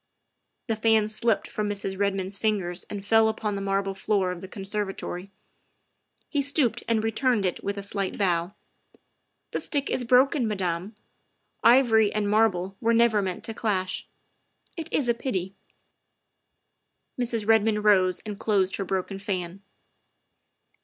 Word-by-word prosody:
' -, -, -52 dB
' -, -, -52 dB
The 225 Hz, -, +2 dB
fan 220 Hz, -1 st, +3 dB
slipped 220 Hz, 0 st, 0 dB
from 210 Hz, -1 st, -3 dB
Mrs. 200 Hz, -1 st, -2 dB
Redmond's 195 Hz, -1 st, 0 dB
fingers 195 Hz, -5 st, -1 dB
and 200 Hz, -1 st, -7 dB
fell 225 Hz, +1 st, +5 dB
upon 215 Hz, -1 st, -2 dB
the 200 Hz, -, -3 dB
marble 195 Hz, 0 st, -1 dB
floor 195 Hz, -1 st, 0 dB
of 175 Hz, -1 st, -7 dB
the 190 Hz, -, -7 dB
conservatory. 195 Hz, -2 st, -4 dB, 1.0 s
He 290 Hz, -, 0 dB
stooped 280 Hz, -3 st, +1 dB
and 225 Hz, -2 st, +1 dB
returned 225 Hz, -1 st, +1 dB
it 180 Hz, -, -2 dB
with 200 Hz, 0 st, -3 dB
a 200 Hz, -, -4 dB
slight 200 Hz, -1 st, -3 dB
bow. 180 Hz, -1 st, 0 dB, 0.4 s
" -, -, -48 dB
The -, -, -2 dB
stick 285 Hz, -2 st, -2 dB
is 250 Hz, -, 0 dB
broken, 255 Hz, +2 st, +3 dB
Madame. 190 Hz, 0 st, -2 dB, 0.7 s
Ivory 230 Hz, -4 st, +5 dB
and 210 Hz, -1 st, -1 dB
marble 200 Hz, -3 st, +2 dB
were 230 Hz, 0 st, +3 dB
never 230 Hz, -2 st, +4 dB
meant 185 Hz, -2 st, -4 dB
to 225 Hz, -, -4 dB
clash. 190 Hz, -5 st, -2 dB, 0.7 s
It 325 Hz, -3 st, -6 dB
is 270 Hz, -, +1 dB
a 235 Hz, -, +4 dB
pity. 195 Hz, -6 st, -3 dB, 0.7 s
' -, -, -52 dB, 0.2 s
' -, -, -13 dB
Mrs. 230 Hz, -3 st, -1 dB
Redmond 220 Hz, -1 st, +3 dB
rose 185 Hz, -4 st, +4 dB
and 210 Hz, -2 st, -7 dB
closed 195 Hz, -3 st, +1 dB
her 195 Hz, -, -2 dB
broken 190 Hz, +1 st, -3 dB
fan. 190 Hz, -2 st, -4 dB
205 Hz, 160 wpm, -26 LUFS, 195-225 Hz, 1.0 s, fell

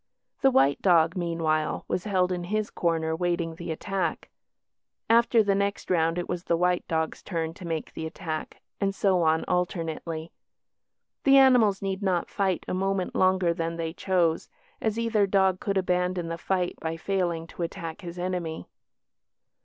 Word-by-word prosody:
The 270 Hz, -, +6 dB
white 140 Hz, -, +3 dB
dog, 170 Hz, -2 st, +4 dB
meanwhile, 165 Hz, -3 st, -1 dB
was 185 Hz, -, -2 dB
held 185 Hz, -3 st, +1 dB
in 175 Hz, -1 st, -2 dB
his 215 Hz, +3 st, -1 dB
corner 160 Hz, -2 st, 0 dB
waiting 170 Hz, -1 st, -1 dB
the 170 Hz, +1 st, -8 dB
attack. 195 Hz, +4 st, -3 dB, 0.8 s
After 235 Hz, -1 st, +5 dB
the 200 Hz, -1 st, +2 dB
next 200 Hz, 0 st, -1 dB
round 165 Hz, -1 st, +2 dB
it 175 Hz, -, -2 dB
was 180 Hz, 0 st, -4 dB
the 170 Hz, -, +1 dB
white 180 Hz, +1 st, +1 dB
dog's 160 Hz, -1 st, -1 dB
turn 165 Hz, -3 st, -3 dB
to 180 Hz, -1 st, -9 dB
make 165 Hz, -2 st, -4 dB
the 160 Hz, -, -4 dB
attack, 160 Hz, -1 st, -6 dB, 0.2 s
and 195 Hz, -1 st, 0 dB
so 190 Hz, -3 st, +2 dB
on 160 Hz, 0 st, +2 dB
alternately. 165 Hz, -2 st, -2 dB, 0.9 s
The 275 Hz, 0 st, +6 dB
animals 240 Hz, -8 st, +5 dB
need 195 Hz, 0 st, -2 dB
not 185 Hz, -3 st, 0 dB
fight 190 Hz, -3 st, 0 dB
a -, -, -2 dB
moment 190 Hz, 0 st, -1 dB
longer 185 Hz, -2 st, +3 dB
than 165 Hz, -1 st, -3 dB
they 165 Hz, -1 st, -3 dB
chose, 175 Hz, -3 st, 0 dB, 0.3 s
as 220 Hz, 0 st, 0 dB
either 225 Hz, -3 st, +2 dB
dog 190 Hz, -1 st, +2 dB
could 200 Hz, -2 st, -1 dB
abandon 180 Hz, -2 st, 0 dB
the 165 Hz, -, -3 dB
fight 180 Hz, 0 st, -1 dB
by 160 Hz, 0 st, -3 dB
failing 175 Hz, -2 st, -1 dB
to 165 Hz, -, -10 dB
attack 165 Hz, -1 st, -5 dB
his 175 Hz, -1 st, -8 dB
enemy. 175 Hz, -, -3 dB
180 Hz, 165 wpm, -27 LUFS, 165-195 Hz, 0.9 s, The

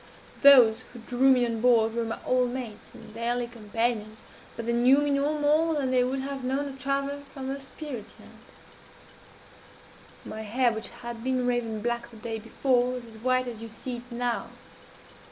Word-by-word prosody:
Those 250 Hz, -6 st, +8 dB
who -, -, -10 dB
drew 250 Hz, +3 st, +2 dB
me 250 Hz, -2 st, +4 dB
on 230 Hz, -2 st, -3 dB
board 225 Hz, -2 st, +4 dB
were 235 Hz, 0 st, -1 dB
my 225 Hz, 0 st, -3 dB
old 255 Hz, -1 st, +2 dB
mates 245 Hz, -4 st, -7 dB
and -, -, -13 dB
daily 240 Hz, +2 st, -1 dB
companions, 225 Hz, -1 st, -3 dB, 0.3 s
but 230 Hz, -, -5 dB
they 235 Hz, -, 0 dB
knew 245 Hz, +3 st, +5 dB
me 290 Hz, 0 st, +1 dB
no 285 Hz, +2 st, +1 dB
more 310 Hz, +2 st, +2 dB
than 270 Hz, -3 st, 0 dB
they 250 Hz, -1 st, +4 dB
would 265 Hz, +2 st, -1 dB
have 275 Hz, -1 st, -5 dB
known 270 Hz, +3 st, -1 dB
a 275 Hz, -, -7 dB
traveller 275 Hz, +1 st, -2 dB
from 265 Hz, -2 st, -6 dB
the 275 Hz, +1 st, -3 dB
spirit 270 Hz, -4 st, -8 dB
land. -, -, -16 dB, 1.9 s
My 220 Hz, -, -6 dB
hair, 235 Hz, +3 st, +1 dB
which 220 Hz, 0 st, -5 dB
had 235 Hz, -1 st, -8 dB
been 255 Hz, -1 st, 0 dB
raven 230 Hz, -3 st, -1 dB
black 235 Hz, 0 st, -2 dB
the 230 Hz, -, -14 dB
day 225 Hz, 0 st, -5 dB
before, 245 Hz, +2 st, +1 dB
was 250 Hz, -1 st, -6 dB
as 225 Hz, -1 st, -13 dB
white 255 Hz, +2 st, +1 dB
as 235 Hz, -3 st, -7 dB
you 230 Hz, -, -7 dB
see 240 Hz, +3 st, -5 dB
it 245 Hz, +1 st, -13 dB
now. 240 Hz, 0 st, -2 dB
245 Hz, 190 wpm, -27 LUFS, 230-265 Hz, 1.9 s, Those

